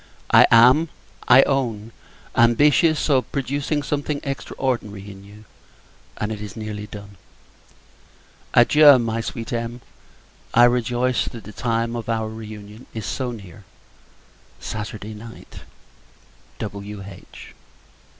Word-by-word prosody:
I -, -, +7 dB
am, 125 Hz, +8 st, +6 dB, 0.4 s
I 130 Hz, +2 st, +8 dB
own, 115 Hz, -5 st, -2 dB, 0.4 s
ambitious 145 Hz, +7 st, +4 dB
of 135 Hz, -4 st, +1 dB
producing 140 Hz, +2 st, -2 dB
something 145 Hz, 0 st, -2 dB
extraordinary 120 Hz, -7 st, -4 dB
in 95 Hz, 0 st, -13 dB
you, 105 Hz, +2 st, -15 dB, 0.7 s
and 105 Hz, +1 st, -3 dB
it 105 Hz, -1 st, -5 dB
is 105 Hz, -3 st, -8 dB
nearly 105 Hz, -1 st, -6 dB
done. 100 Hz, -1 st, -11 dB, 1.4 s
Adieu! 145 Hz, +3 st, +7 dB
my 115 Hz, -1 st, -2 dB
sweet 115 Hz, +1 st, -6 dB
Em. 115 Hz, +1 st, -3 dB, 0.8 s
I 120 Hz, -, +7 dB
rejoice 120 Hz, +1 st, +2 dB
that 115 Hz, -3 st, -8 dB
the 105 Hz, +2 st, -11 dB
time 115 Hz, 0 st, -1 dB
of 115 Hz, -1 st, -5 dB
our 110 Hz, -1 st, -1 dB
re 110 Hz, 0 st, -8 dB
union 105 Hz, +2 st, -11 dB
is 110 Hz, -3 st, -5 dB
so 130 Hz, -2 st, -3 dB
near 100 Hz, -4 st, -11 dB, 1.0 s
Saturday 105 Hz, 0 st, -6 dB
night! 115 Hz, +2 st, -12 dB, 1.0 s
W.H. 100 Hz, -2 st, -9 dB
115 Hz, 115 wpm, -22 LUFS, 105-130 Hz, 1.4 s, I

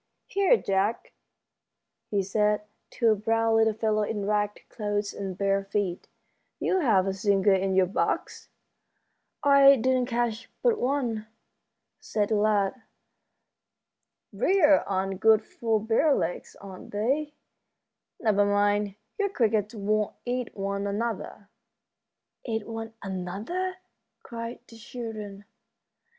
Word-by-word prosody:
"Here, 400 Hz, +4 st, +3 dB
Jack," 195 Hz, -, -1 dB, 1.0 s
he 200 Hz, -2 st, 0 dB
said, 210 Hz, +2 st, +1 dB, 0.3 s
to 230 Hz, -3 st, +2 dB
a -, -, +3 dB
brown 225 Hz, +2 st, +1 dB
little 220 Hz, -1 st, +3 dB
fellow 215 Hz, -1 st, +1 dB
in 210 Hz, -1 st, -2 dB
ragged 210 Hz, 0 st, -1 dB
clothes 205 Hz, -2 st, -3 dB
and 190 Hz, -2 st, -5 dB
bare 195 Hz, 0 st, +1 dB
feet, 195 Hz, -3 st, -2 dB, 0.5 s
"you 375 Hz, -, +1 dB
have 215 Hz, -, +3 dB
a 195 Hz, -, -1 dB
singer 200 Hz, 0 st, +2 dB
in 190 Hz, 0 st, +1 dB
your 190 Hz, -1 st, +5 dB
box." 185 Hz, -, -2 dB, 0.9 s
"I 280 Hz, -1 st, +7 dB
didn't 255 Hz, 0 st, +1 dB
catch 235 Hz, -1 st, -2 dB
but 475 Hz, -3 st, +3 dB
one," 245 Hz, -5 st, -1 dB, 0.7 s
said 210 Hz, -2 st, -1 dB
the 220 Hz, -, +2 dB
lad. 210 Hz, +3 st, +1 dB, 1.5 s
"Briers 365 Hz, -10 st, +4 dB
aren't 190 Hz, -1 st, -2 dB
good 220 Hz, 0 st, +4 dB
for 225 Hz, -2 st, -1 dB
bare 225 Hz, +7 st, +2 dB
legs, 175 Hz, -, -3 dB
are 190 Hz, -2 st, -10 dB
they? 275 Hz, +9 st, -2 dB, 0.8 s
Never 210 Hz, -3 st, +3 dB
mind, 205 Hz, 0 st, +1 dB, 0.2 s
your 405 Hz, -1 st, +1 dB
crickets 220 Hz, -, 0 dB
won't 210 Hz, 0 st, 0 dB
eat 245 Hz, -2 st, -3 dB
one 200 Hz, 0 st, -2 dB
another." 210 Hz, -1 st, -4 dB, 1.0 s
"Eat 225 Hz, -3 st, -3 dB
one 225 Hz, 0 st, -6 dB
another?" 200 Hz, -, -4 dB, 0.5 s
cried 230 Hz, -1 st, -7 dB
the 230 Hz, -, -14 dB
children. 215 Hz, -3 st, -7 dB
215 Hz, 120 wpm, -27 LUFS, 200-235 Hz, 1.5 s, I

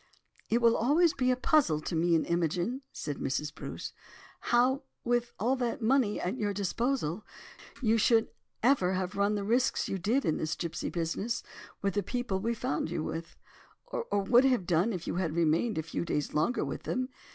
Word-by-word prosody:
"It 235 Hz, +1 st, +2 dB
will 230 Hz, 0 st, +6 dB
always 305 Hz, +8 st, +3 dB
be 255 Hz, -1 st, +1 dB
a 255 Hz, -, +4 dB
puzzle 255 Hz, -, +3 dB
to 170 Hz, -, -3 dB
me 170 Hz, +1 st, +3 dB
and 160 Hz, -, +2 dB
Imogen," 175 Hz, -, 0 dB
said 145 Hz, -2 st, -5 dB
Mrs. 150 Hz, +3 st, -2 dB
Bruce, -, -, -7 dB, 0.5 s
"how, 255 Hz, +3 st, +2 dB, 0.2 s
with 240 Hz, 0 st, 0 dB
all 240 Hz, +6 st, +2 dB
that 245 Hz, +1 st, -1 dB
money 235 Hz, -2 st, +2 dB
at 190 Hz, +8 st, -2 dB
your 205 Hz, -2 st, -1 dB
disposal, 210 Hz, -, -1 dB, 0.6 s
you 225 Hz, 0 st, +3 dB
should 225 Hz, +1 st, +4 dB, 0.3 s
ever 230 Hz, -8 st, +3 dB
have 185 Hz, -1 st, -2 dB
run 200 Hz, +1 st, +2 dB
the 205 Hz, -, -2 dB
risks 240 Hz, +5 st, +1 dB
you 195 Hz, -, -2 dB
did 235 Hz, +10 st, +1 dB
in 155 Hz, -, +1 dB
this 155 Hz, 0 st, -2 dB
gipsy 170 Hz, -2 st, -3 dB
business, 175 Hz, +7 st, -2 dB, 0.4 s
with 195 Hz, -1 st, +1 dB
the 205 Hz, -, +1 dB
people 240 Hz, -1 st, -2 dB
we 230 Hz, +4 st, -1 dB
found 150 Hz, -6 st, -2 dB
you 160 Hz, -2 st, -2 dB
with, 165 Hz, +1 st, -5 dB, 0.5 s
or 205 Hz, -, -2 dB
would 240 Hz, +5 st, +5 dB
have 250 Hz, -8 st, +2 dB
done, 175 Hz, +6 st, +2 dB
if 180 Hz, -5 st, -4 dB
you -, -, -2 dB
had 165 Hz, -4 st, -1 dB
remained 170 Hz, +6 st, +2 dB
a 160 Hz, -, 0 dB
few 165 Hz, -, -3 dB
days 150 Hz, -4 st, -2 dB
longer 160 Hz, +12 st, +1 dB
with -, -, -5 dB
them. 255 Hz, 0 st, -2 dB
205 Hz, 190 wpm, -30 LUFS, 170-245 Hz, 0.6 s, will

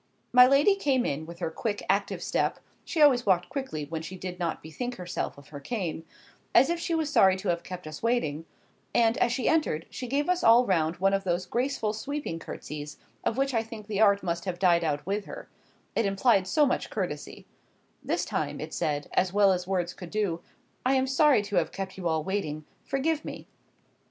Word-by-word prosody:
My 250 Hz, 0 st, +9 dB
lady 280 Hz, +9 st, +5 dB
came 275 Hz, -10 st, +1 dB
in, 155 Hz, +3 st, -3 dB
with 170 Hz, 0 st, -9 dB
her 170 Hz, -2 st, -3 dB
quick 205 Hz, +4 st, -3 dB
active 200 Hz, +1 st, 0 dB
step—she 340 Hz, -, -3 dB
always 275 Hz, -5 st, +6 dB
walked 180 Hz, -2 st, +3 dB
quickly 260 Hz, -, -4 dB
when 160 Hz, +2 st, -5 dB
she 185 Hz, +4 st, -7 dB
did 180 Hz, 0 st, -6 dB
not 170 Hz, -2 st, -2 dB
bethink 245 Hz, +11 st, -5 dB
herself 180 Hz, -4 st, -4 dB
of 140 Hz, -, -15 dB
her 145 Hz, -, -8 dB
cane—as 185 Hz, -, -1 dB
if 340 Hz, -, -1 dB
she 335 Hz, 0 st, -1 dB
was 315 Hz, -2 st, -1 dB
sorry 190 Hz, -9 st, +5 dB
to 190 Hz, 0 st, -4 dB
have 170 Hz, -1 st, +1 dB
us -, -, -26 dB
kept 175 Hz, -4 st, -8 dB
waiting—and, 225 Hz, +2 st, -1 dB
as -, -, +3 dB
she 250 Hz, +1 st, -1 dB
entered, 300 Hz, -, +1 dB
she 250 Hz, -, -5 dB
gave 280 Hz, +4 st, 0 dB
us 360 Hz, -1 st, +1 dB
all 235 Hz, +2 st, +7 dB
round 165 Hz, -4 st, +1 dB
one 195 Hz, +2 st, +2 dB
of 195 Hz, 0 st, +1 dB
those 180 Hz, -1 st, -1 dB
graceful 240 Hz, 0 st, -1 dB
sweeping 270 Hz, -, -4 dB
curtsies, 150 Hz, -2 st, -7 dB, 0.3 s
of 230 Hz, -, -1 dB
which 270 Hz, 0 st, +1 dB
I 225 Hz, -, +2 dB
think 225 Hz, -1 st, -9 dB
the 205 Hz, 0 st, -2 dB
art 200 Hz, -2 st, +5 dB
must 170 Hz, -1 st, -2 dB
have 180 Hz, -2 st, -3 dB
died 175 Hz, -2 st, +3 dB
out 145 Hz, -2 st, -1 dB
with 200 Hz, +2 st, -2 dB
her,—it -, -, -7 dB
implied 195 Hz, -1 st, +3 dB
so 295 Hz, +9 st, +4 dB
much 270 Hz, -, -1 dB
courtesy;—this 180 Hz, -8 st, -6 dB
time -, -, -2 dB
it -, -, -6 dB
said, 145 Hz, -1 st, -1 dB
as 185 Hz, -1 st, +2 dB
well 200 Hz, 0 st, +5 dB
as 180 Hz, -1 st, -1 dB
words 180 Hz, -2 st, -1 dB
could 180 Hz, -, -9 dB
do, 200 Hz, -5 st, -1 dB, 0.4 s
"I 260 Hz, +2 st, +3 dB
am 260 Hz, 0 st, +2 dB
sorry 270 Hz, -3 st, +4 dB
to 205 Hz, -2 st, -2 dB
have 170 Hz, -, +1 dB
kept 195 Hz, -1 st, -5 dB
you 185 Hz, -2 st, -3 dB
all 160 Hz, -1 st, 0 dB
waiting,—forgive 205 Hz, -, -2 dB
me." -, -, -7 dB
195 Hz, 195 wpm, -28 LUFS, 170-250 Hz, 0.4 s, My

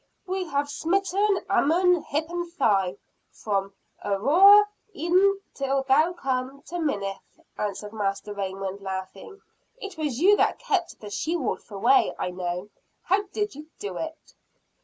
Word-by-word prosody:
"We 375 Hz, 0 st, -2 dB
have 285 Hz, -3 st, -1 dB
smitten 390 Hz, +6 st, 0 dB
Ammon, 355 Hz, +3 st, +3 dB
hip 310 Hz, +1 st, -2 dB
and 345 Hz, 0 st, -4 dB
thigh, 200 Hz, -, +1 dB, 0.3 s
from 200 Hz, -2 st, -2 dB, 0.3 s
Aroer 345 Hz, -, +6 dB, 0.3 s
even 370 Hz, +5 st, +3 dB
till 275 Hz, 0 st, -1 dB
thou 310 Hz, +6 st, +3 dB
come 265 Hz, -3 st, -3 dB
to 350 Hz, -, -6 dB
Minnith!" 200 Hz, -, -3 dB, 0.2 s
answered 210 Hz, 0 st, -4 dB
Master 205 Hz, -1 st, -2 dB
Raymond, 195 Hz, 0 st, -4 dB
laughing. 190 Hz, -, -7 dB, 0.4 s
"It 400 Hz, -8 st, -8 dB
was 285 Hz, -6 st, -2 dB
you 395 Hz, +5 st, +6 dB
that -, -, +2 dB
kept 400 Hz, -9 st, -2 dB
the 210 Hz, -1 st, -8 dB
she 325 Hz, +10 st, -1 dB
wolf 285 Hz, -7 st, -3 dB
away, 355 Hz, -, +3 dB
I 180 Hz, -, -2 dB
know. 180 Hz, +2 st, -4 dB, 0.3 s
How 385 Hz, +3 st, +2 dB
did 420 Hz, -1 st, -2 dB
you 300 Hz, +3 st, -11 dB
do 195 Hz, -3 st, -5 dB
it?" 320 Hz, 0 st, -7 dB
285 Hz, 140 wpm, -26 LUFS, -, 0.4 s, Aroer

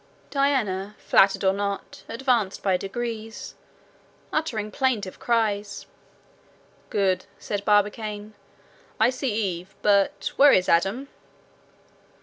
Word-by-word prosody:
Diana, 215 Hz, -9 st, 0 dB
flattered 195 Hz, 0 st, +3 dB
or 190 Hz, -, +4 dB
not, 200 Hz, 0 st, -4 dB
advanced 235 Hz, -6 st, 0 dB
by 190 Hz, -2 st, +3 dB
degrees, 225 Hz, +3 st, -5 dB, 0.8 s
uttering 225 Hz, -10 st, -1 dB
plaintive 240 Hz, -9 st, -1 dB
cries. 210 Hz, -4 st, 0 dB, 1.0 s
"Good," 190 Hz, -2 st, +1 dB
said 200 Hz, -1 st, -4 dB
Barbicane: 210 Hz, 0 st, 0 dB, 0.7 s
"I 225 Hz, +3 st, +5 dB
see 260 Hz, 0 st, -2 dB
Eve, 195 Hz, -4 st, -3 dB
but 200 Hz, -1 st, +2 dB
where 285 Hz, +1 st, +8 dB
is 185 Hz, -, +3 dB
Adam?" 195 Hz, +11 st, +2 dB
210 Hz, 100 wpm, -25 LUFS, 195-235 Hz, 1.0 s, where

